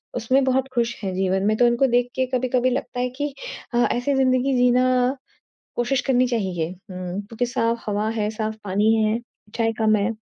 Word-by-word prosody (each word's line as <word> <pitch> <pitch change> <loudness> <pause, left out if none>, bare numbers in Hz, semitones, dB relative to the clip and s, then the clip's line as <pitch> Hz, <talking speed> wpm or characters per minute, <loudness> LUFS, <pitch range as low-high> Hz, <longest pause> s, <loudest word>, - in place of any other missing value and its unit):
उसमें 255 +3 +2
बहुत 265 0 +1
खुश 235 -1 0
हैं 190 - -2
जीवन 190 0 0
में। 215 - +3
तो 245 - +4
उनको 240 +3 +3
देख 245 0 +2
के 260 - +1
कभी-कभी 255 0 +1
लगता 250 -1 -3
है 250 0 0
कि 290 -1 -2 0.4
अ, - - +1
ऐसी 245 +4 0
ज़िंदगी 260 0 +2
जीना 250 +1 +3 0.6
कोशिश 245 +2 0
करनी 255 -1 +3
चाहिए। 190 -9 -1
हुँ, 185 0 -7
क्योंकि 225 +4 -3
साफ़ 235 -1 -1
हवा 210 +1 0
है, 215 -2 -1
साफ़ 220 0 -3
पानी 205 +3 +2
है, 215 +1 +2 0.3
इच्छाएँ 225 +1 -1
कम 215 -1 +4
है। 200 +2 0
235 Hz, 185 wpm, -23 LUFS, 215-255 Hz, 0.6 s, तो